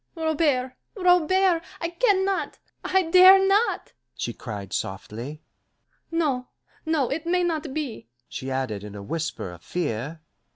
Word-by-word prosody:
"Robert, 300 -6 +1 0.2
Robert! 360 -1 +3 0.2
I 335 - -2
can 380 +1 +2
not, 390 -1 -2 0.3
I 380 0 +2
dare 370 +3 +8
not!" 410 +4 +1 0.2
she - - -3
cried 100 -5 -7
softly. 120 +10 -5 0.7
"No, 290 -7 0 0.4
no, 305 -6 +1
it 320 +4 -3
may 360 +1 +2
not 320 -4 -1
be," 275 - -5 0.2
she 130 - -6
added 130 -6 -2
in 105 0 -9
a 100 - -7
whisper 155 - -4
of 85 -1 -12
fear. 150 - -3
300 Hz, 135 wpm, -25 LUFS, -, 0.7 s, dare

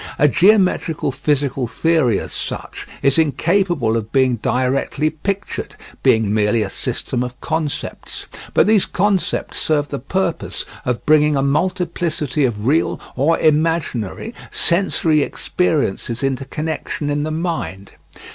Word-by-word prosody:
A 150 - +5
geometrical 180 - +3
physical 140 -2 0
theory 155 -6 +2
as - - -7
such - - -5 0.2
is 140 +3 +4
incapable 160 - +1
of 110 -1 -3
being 130 -3 +3
directly 130 +6 0
pictured, 195 +6 -4 0.3
being 110 -2 +3
merely 105 +1 +2
a 100 - -5
system 120 - -3
of 125 0 -5
concepts. 160 -3 -4 0.3
But - - +5
these 210 -1 +3
concepts 195 0 0
serve 145 -2 +1
the 140 - -4
purpose 170 +6 -2 0.2
of 125 -3 -2
bringing 150 -1 +4
a 135 - +1
multiplicity 160 -2 0
of 105 -4 -2
real 150 +6 +2 0.2
or 145 +6 +2
imaginary 155 - 0 0.2
sensory 170 -3 +2
experiences 140 - -1
into 135 -1 -1
connection 155 0 -3
in 145 0 0
the 155 - -2
mind. 155 - -3
150 Hz, 130 wpm, -19 LUFS, 130-165 Hz, 0.3 s, A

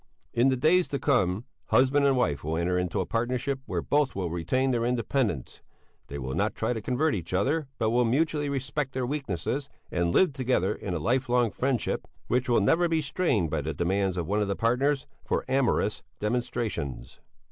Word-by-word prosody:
In 120 +3 +4
the 130 - +1
days 170 +7 +4
to 140 - -2
come, 115 -7 +1 0.2
husband 140 +2 +4
and 135 -2 +3
wife 75 - 0
will 80 +2 -1
enter 90 +2 0
into 90 +1 0
a - - -2
partnership 125 +5 -1
where - - -2
both 145 -2 +1
will 90 -4 -2
retain 110 - 0
their 120 -2 0
independence; 120 - -1 0.5
they 70 - -6
will 65 -1 -4
not - - 0
try - - 0
to 110 - -4
convert 130 +8 +1
each 90 -3 -3
other, 140 - +1
but 110 -1 +1
will 125 +1 +3
mutually 145 +4 +1
respect 135 0 -2
their 130 -1 -1
weaknesses, 135 - -3 0.2
and 85 -1 +1
live 180 - +4
together 130 -8 +1
in 90 -3 -4
a - - -1
life 125 - 0
long 120 -2 +3
friendship 130 -3 -1 0.2
which 125 0 0
will 120 - +4
never 165 - +3
be 165 -1 +2
strained 140 - 0
by 80 - 0
the 75 +1 -4
demands 95 +3 0
of 85 - -1
one 105 +5 0
of 105 - 0
the 100 - -1
partners 130 +6 +1 0.2
for - - -1
amorous 130 -5 +1 0.2
demonstrations. 105 - -3
120 Hz, 195 wpm, -27 LUFS, 95-135 Hz, 0.5 s, In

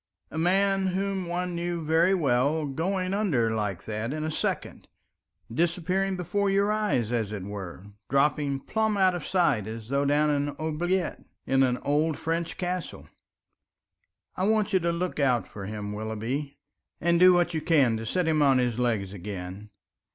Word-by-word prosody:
a - - -6
man 195 +2 +2
whom 190 0 -1
one 180 +1 -2
knew 170 -1 -3
very 165 +5 +4
well 145 0 +1
going 185 +6 -1
under 155 - +1
like 105 -4 -2
that 110 +2 -3
in 155 +1 -3
a 155 - -2
second, - - -3 0.7
disappearing 180 +5 0
before 200 +3 0
your 200 +1 +2
eyes 205 - 0
as 115 -4 -1
it 100 -3 -5
were, 95 -2 -7 0.2
dropping 140 0 +1
plumb 220 +5 0
out 190 -2 +4
of 175 -3 -4
sight 150 - +2
as 110 0 -7
though 140 +1 +1
down 150 +1 +3
an 145 0 -1
oubliette 170 +4 -1 0.2
in 135 0 +2
an 125 -2 +3
old 150 +2 +1
French 165 +1 -2
castle. 180 -1 -4 1.3
I 185 - 0
want 215 -1 +1
you 190 - +5
to 170 0 0
look 175 -1 -3
out 125 -4 +2
for 100 -2 -8
him, 105 -1 -5
Willoughby, 115 +7 -4 0.4
and 170 +1 +2
do 185 +1 +8
what 175 0 +2
you 160 - -1
can 145 -9 +3
to 115 - -6
set 180 +6 0
him 155 -1 +2
on 135 -2 +5
his 125 -2 0
legs 110 -6 0
again. 95 +1 -7
155 Hz, 170 wpm, -27 LUFS, 120-180 Hz, 1.3 s, do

